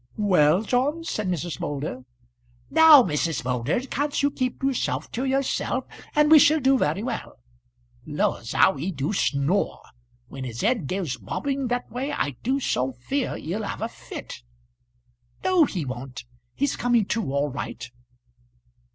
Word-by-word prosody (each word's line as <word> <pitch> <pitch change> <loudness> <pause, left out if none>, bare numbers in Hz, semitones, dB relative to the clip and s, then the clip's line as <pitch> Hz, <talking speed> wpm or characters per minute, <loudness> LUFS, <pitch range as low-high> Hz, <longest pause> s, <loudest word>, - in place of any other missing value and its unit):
"Well, 185 -3 +3
John?" 275 +8 0
said 215 - -3
Mrs. 175 -5 -3
Moulder. 140 -3 -4 0.7
"Now, 320 -4 +8
Mrs. 160 - -1
Moulder, 125 - 0
can't 285 +2 -2
you 285 - +3
keep 255 -1 -3
yourself 270 -2 -1
to 250 +3 -2
yourself, 270 0 0 0.3
and 300 +1 +4
we 315 - +10
shall 310 +2 +5
do 270 0 +4
very 180 - 0
well. 240 -2 -5 0.7
Laws, 145 -6 -1
how 190 - +4
he 155 +8 -3
do 145 +3 -2
snore! 155 +2 0 0.5
When 135 +1 -8
his 120 -2 -5
head 220 - +1
goes 175 -8 -2
bobbing 270 - -3
that 245 -1 -3
way 260 +5 -3
I 145 - -1
do 265 +4 0
so 130 - -1
fear 255 - -3
he'll 180 +8 -4
have 210 - -4
a - - 0
fit." - - -9 1.0
"No 370 -4 +4
he 175 - -4
won't; 130 0 -7 0.3
he's 285 0 0
coming 240 -3 +2
to, 220 -9 -2
all 140 +1 0
right. 120 -3 -6
205 Hz, 150 wpm, -25 LUFS, -, 1.0 s, we